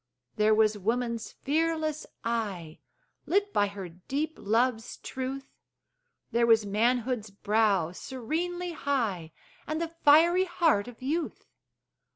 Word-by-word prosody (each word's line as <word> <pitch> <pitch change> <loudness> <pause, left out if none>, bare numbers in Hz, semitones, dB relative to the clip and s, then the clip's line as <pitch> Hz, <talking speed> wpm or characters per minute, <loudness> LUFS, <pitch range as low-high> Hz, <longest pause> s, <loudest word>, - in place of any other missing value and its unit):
There 215 0 +4
was 215 -1 +3
woman's 235 +2 -1
fearless 310 +1 -1 0.2
eye, 200 -9 -3 0.5
Lit 405 +3 +1
by 205 - +3
her 200 -2 -7
deep 270 - -4
love's 225 +2 0
truth; 265 +1 -6 0.8
There 235 0 +3
was 225 -2 +5
manhood's 230 +2 0
brow 200 -4 +1
serenely 330 - -3
high, 225 - -1 0.4
And 310 +1 -2
the 335 -1 -2
fiery 340 +5 +6
heart 320 - +2
of 245 +1 -11
youth. 310 +5 -2
240 Hz, 115 wpm, -28 LUFS, 210-310 Hz, 0.8 s, fiery